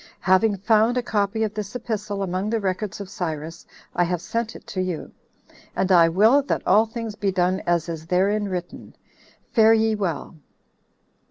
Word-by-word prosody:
Having 195 +3 +3
found 220 +4 +3
a 250 - 0
copy 210 0 0
of 215 -1 -2
this 210 +1 -6
epistle 210 -4 -3
among 185 +2 -2
the 225 0 0
records 200 +1 -3
of 200 - -6
Cyrus, 165 -4 -5 0.3
I 175 - +3
have 175 0 -1
sent 225 +6 -3
it 235 - -11
you; 185 -3 -3 0.6
and 190 0 0
I 170 -2 +6
will 220 +11 +5
that 275 - -3
all 220 +2 +4
things 225 -1 -5
be 205 -2 -1
done 185 0 +1
as 170 -1 +1
is 165 -1 -6
therein 200 +4 +1
written. 180 -2 -6 0.6
Fare 225 -1 +6
ye 220 0 +2
well." 175 -6 -3
200 Hz, 170 wpm, -23 LUFS, 180-220 Hz, 0.6 s, I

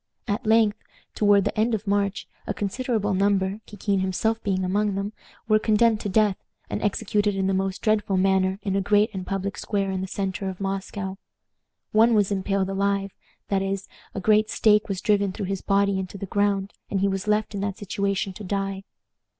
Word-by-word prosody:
At 215 +3 -2
length, 220 -2 +4 0.3
toward 205 -1 +4
the - - -1
end 220 +2 +2
of 215 0 -6
March, 200 -1 0 0.2
a - - -2
considerable 210 0 -1
number, 195 +1 +1
Kikin 205 -1 -1
himself 220 +5 0
being 190 -3 0
among 200 +2 0
them, 200 +2 -3 0.3
were 215 -1 +4
condemned 220 0 +3
to 205 - -3
death, 205 0 +3 0.3
and - - -2
executed 205 0 0
in 195 -1 0
the 190 - +1
most 190 0 -2
dreadful 210 -3 +2
manner 190 0 +2
in 195 -1 -1
a 195 - +2
great 205 +3 +3 0.2
public 195 0 -3
square 200 -2 -1
in 190 -1 -2
the 190 - -3
centre 190 0 -3
of 185 - -7
Moscow. 195 0 -4 0.7
One 225 +2 +5
was 205 -1 +2
impaled 195 0 0
alive; 195 0 0 0.4
that 195 -1 +1
is, 195 0 -2 0.3
a - - -1
great 215 +2 +3
stake 210 -1 +3
was 195 -1 -2
driven 200 -2 +2
through 200 - -4
his 195 0 -3
body 200 -1 +2
into 190 +1 -5
the 195 - -5
ground, 200 0 0 0.2
and 195 - -1
he 200 - +3
was 195 +1 -2
left 210 +1 +1
in 200 - -3
that 200 -1 -2
situation 200 -1 -2
to 210 - -9
die. 195 0 -2
200 Hz, 190 wpm, -25 LUFS, 195-210 Hz, 0.7 s, One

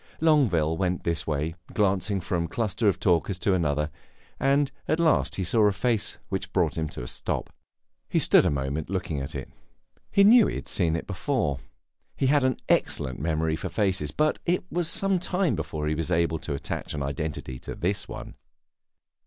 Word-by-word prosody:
Longueville 105 - +3
went 90 -1 -1
his 85 -2 -1
way, 75 +1 -1 0.2
glancing 100 -1 +1
from 85 0 -1
one - - -7
cluster 110 -1 -1
of 100 - +2
talkers 90 +1 +2
to 95 +1 +1
another; 75 -3 0 0.5
and 140 +1 +2 0.2
at 155 +2 +1
last 165 -2 +2
he 95 - -1
saw 105 +4 +3
a - - +3
face 115 +1 0
which - - -3
brought - - +1
him 80 -2 -2
to 65 - -6
a - - -6
stop. - - -4 0.6
He - - 0
stood - - +6
a - - +2
moment 70 +2 -2
looking 90 -6 -2
at 70 +3 -6
it; 70 - -6 0.6
he 200 - +4
knew 225 +2 +7
he - - -3
had - - -6
seen 85 -4 +1
it 80 - -3
before. 100 - -1 0.6
He - - 0
had 140 +1 +4
an 130 -1 +2
excellent 65 -4 0
memory 80 +1 0
for - - -5
faces; 95 -8 0
but 155 - +1
it 180 +1 +1
was 175 -1 0
some 195 +2 +2
time 180 -3 +1
before 75 -2 -4
he 75 - +1
was 80 +1 -2
able 85 -2 +1
to 75 -2 -4
attach 70 - -4
an 70 - -2
identity 70 -2 -4
to - - -7
this 95 +4 -1
one. - - -8
90 Hz, 195 wpm, -26 LUFS, 75-125 Hz, 0.6 s, knew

